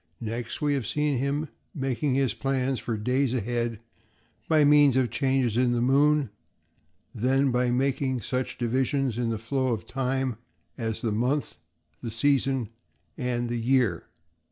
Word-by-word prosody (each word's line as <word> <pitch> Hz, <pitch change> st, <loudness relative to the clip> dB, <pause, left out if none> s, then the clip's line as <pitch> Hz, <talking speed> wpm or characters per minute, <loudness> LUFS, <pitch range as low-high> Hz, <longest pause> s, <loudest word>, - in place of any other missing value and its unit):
Next, 115 Hz, +4 st, -5 dB
we 145 Hz, -1 st, +2 dB
have 135 Hz, -6 st, -2 dB
seen 145 Hz, +2 st, 0 dB
him 140 Hz, +3 st, -1 dB, 0.3 s
making 135 Hz, -1 st, -1 dB
his 135 Hz, -5 st, +1 dB
plans 135 Hz, -1 st, -1 dB
for 115 Hz, -2 st, -3 dB
days 125 Hz, +4 st, 0 dB
ahead 120 Hz, -1 st, -2 dB, 0.7 s
by 155 Hz, -2 st, +4 dB
means 145 Hz, -2 st, +6 dB
of 130 Hz, -, +4 dB
the -, -, -1 dB
changes 130 Hz, -5 st, +1 dB
in 125 Hz, -1 st, +3 dB
the 120 Hz, -, +1 dB
moon, 140 Hz, +1 st, +3 dB, 0.8 s
then 135 Hz, +4 st, +2 dB
by 125 Hz, 0 st, +1 dB
making 130 Hz, 0 st, 0 dB
such 130 Hz, +3 st, -3 dB
division 130 Hz, +3 st, 0 dB
in 120 Hz, -1 st, -1 dB
the 115 Hz, -, -1 dB
flow 130 Hz, +4 st, -1 dB
of 115 Hz, -4 st, -2 dB
time 130 Hz, -2 st, -1 dB, 0.4 s
as 115 Hz, +1 st, -3 dB
the 115 Hz, -, 0 dB
month, 125 Hz, -, -1 dB, 0.4 s
the 120 Hz, -, -4 dB
season, 135 Hz, +2 st, +1 dB, 0.5 s
and 120 Hz, -1 st, -2 dB
the 120 Hz, 0 st, -2 dB
year. 115 Hz, -7 st, +1 dB
130 Hz, 155 wpm, -27 LUFS, 120-135 Hz, 0.8 s, means